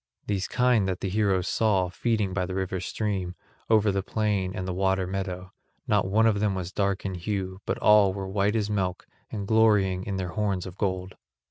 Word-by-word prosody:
These 100 -2 -1
kine 125 -5 +2
the 95 +1 -2
heroes 95 -2 +1
saw 100 -5 +2
feeding 105 0 -1
by 90 -1 -1
the 95 - -4
river's 95 -1 -2
stream, 95 -4 -2 0.3
over 110 -2 +4
the 100 0 0
plain 100 -2 -1
and 95 0 -4
the 90 - -2
water 95 0 +1
meadow; 95 0 -4 0.3
not 105 -2 +2
one 110 +4 +3
of 110 -3 +3
them 100 -2 +1
was 95 -1 -4
dark 100 -1 -1
in 95 - -2
hue 95 +1 -4
but - - 0
all 105 -2 +5
were 95 0 -5
white 100 +2 +1
as 105 -2 +1
milk 95 -3 -2 0.3
and 100 -2 -4
glorying 105 -4 +3
in 100 - -3
their 95 -1 -3
horns 100 -1 -1
of 90 -2 -8
gold. 95 -2 -3
95 Hz, 200 wpm, -26 LUFS, 95-105 Hz, 0.3 s, all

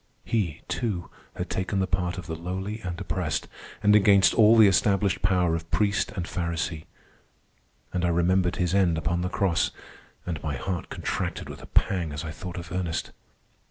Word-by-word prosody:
He, 100 -10 -1
too, 105 -8 -2 0.2
had - - -3
taken 95 +1 -2
the 95 - +2
part 90 0 -1
of 90 - -6
the 80 - -5
lowly 95 +6 -4
and 90 -2 -5
oppressed, - - -2 0.4
and 105 0 +6
against 100 -1 +6
all 110 0 +6
the 110 - +9
established 100 0 +2
power 90 -3 +2
of 80 0 -3
priest 100 -1 +1
and 90 - -3
pharisee. 85 -2 -3 1.1
And 90 - -1
I - - +3
remembered 90 +1 +2
his 90 -1 0
end 90 -4 +3
upon 85 +2 -1
the 90 - -1
cross, 90 -2 +1 0.6
and 85 -5 -4
my 75 -2 -2
heart 90 +2 -4
contracted - - -3
with - - -8
a - - -11
pang 85 -6 +1
as 75 - -4
I 80 - -4
thought 90 +2 -7
of 85 0 -7
Ernest. 85 -2 -2
90 Hz, 180 wpm, -26 LUFS, 85-100 Hz, 1.1 s, the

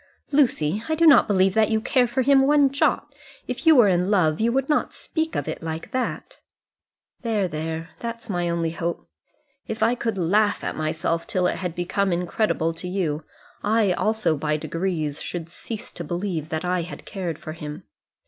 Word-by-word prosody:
"Lucy, 215 - +2
I 315 - +2
do 335 +1 +3
not 305 -3 +7
believe 190 -2 +3
that 220 +1 +3
you 220 0 +2
care 250 +2 +2
for 240 +2 0
him 270 0 +5
one 290 -2 +4
jot. 280 - +1 0.3
If - - -4
you 320 - +8
were 245 -5 +7
in 180 0 +2
love 175 -4 +2
you 230 +1 +3
would 270 +2 0
not 300 - 0
speak 320 -1 -3
of - - -2
it - - -4
like 160 0 -5
that." 255 -1 -3 0.8
"There, 215 -5 0
there. 160 0 -4
That's 230 0 -4
my 175 -4 -1
only 170 -1 0
hope. 170 - -4 0.6
If 220 - -2
I 235 - +4
could 225 -4 -2
laugh 205 +4 +2
at - - -3
myself 160 +2 -1
till 180 -1 0
it - - +1
had 180 -3 -4
become 190 +2 0
incredible 175 -1 0
to 165 +2 -7
you, 165 -5 -1 0.4
I 210 -2 +3
also, 215 -3 +1
by 150 +1 -1
degrees, 160 -3 -2
should 170 -2 -5
cease 215 +5 -7
to - - -7
believe 175 -3 -3
that 160 +2 -3
I 180 0 +1
had 170 - -8
cared 180 -6 -4
for 155 - -7
him. 150 -2 -7
185 Hz, 190 wpm, -24 LUFS, 165-225 Hz, 0.8 s, you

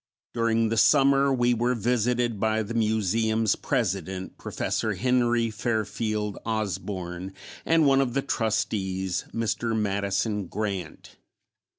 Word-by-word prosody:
During 115 -1 +1
the 115 - -1
summer 140 +2 +5
we 120 -2 +2
were 120 +2 +1
visited 120 0 0
by 110 +1 +1
the 110 +3 -6
Museum's 110 -1 +1
President, 95 - -2
Prof. - - -9 0.4
Henry 120 -2 +2
Fairfield 110 -2 -2
Osborn, 95 -4 -4 0.3
and 165 -1 +4
one 135 -1 +5
of 125 -2 -1
the 140 - +1
Trustees, 95 -7 -1
Mr. 115 0 -1
Madison 100 0 -1
Grant. 100 -6 -5
110 Hz, 110 wpm, -26 LUFS, 100-120 Hz, 0.4 s, summer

